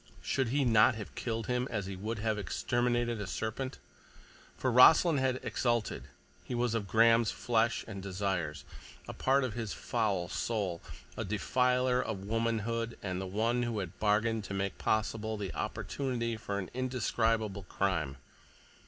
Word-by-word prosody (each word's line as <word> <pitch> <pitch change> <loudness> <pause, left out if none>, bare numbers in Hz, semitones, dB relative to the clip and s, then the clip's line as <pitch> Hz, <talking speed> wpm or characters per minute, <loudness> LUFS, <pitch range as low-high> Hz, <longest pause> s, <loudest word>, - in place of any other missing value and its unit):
Should 135 -2 0
he 140 +3 +1
not 115 0 +5
have 105 -5 -7
killed 115 -1 -3
him, 125 +1 0
as 105 -3 -2
he 95 0 -5
would 110 +4 -4
have 110 0 -1
exterminated 120 +2 0
a 100 - -4
serpent? 110 +7 -3 0.8
For 130 - 0
Rossland 150 +5 +7
had 130 -1 +1
exulted; 120 -3 -1 0.4
he 125 - -4
was 120 -1 +1
of 110 -3 -1
Graham's 115 +2 +5
flesh 115 -1 +1
and 100 -3 -6
desires, 95 -6 -2 0.4
a - - -5
part 135 +1 +2
of 125 -4 -2
his 115 -3 -4
foul 105 -8 -1
soul, 95 -5 -2 0.3
a - - -3
defiler 125 +5 +2
of 100 -5 -4
womanhood 115 +1 -1
and 95 -1 -2
the 95 - -4
one 115 +5 +1
who 120 -2 -1
had 90 -4 -5
bargained 110 +1 +2
to 100 - -5
make 95 0 -2
possible 110 0 0
the 100 -3 -4
opportunity 115 +3 -2
for 100 -2 -4
an 95 -2 -5
indescribable 115 -5 0
crime. 80 -8 -1
110 Hz, 155 wpm, -32 LUFS, 100-120 Hz, 0.8 s, Rossland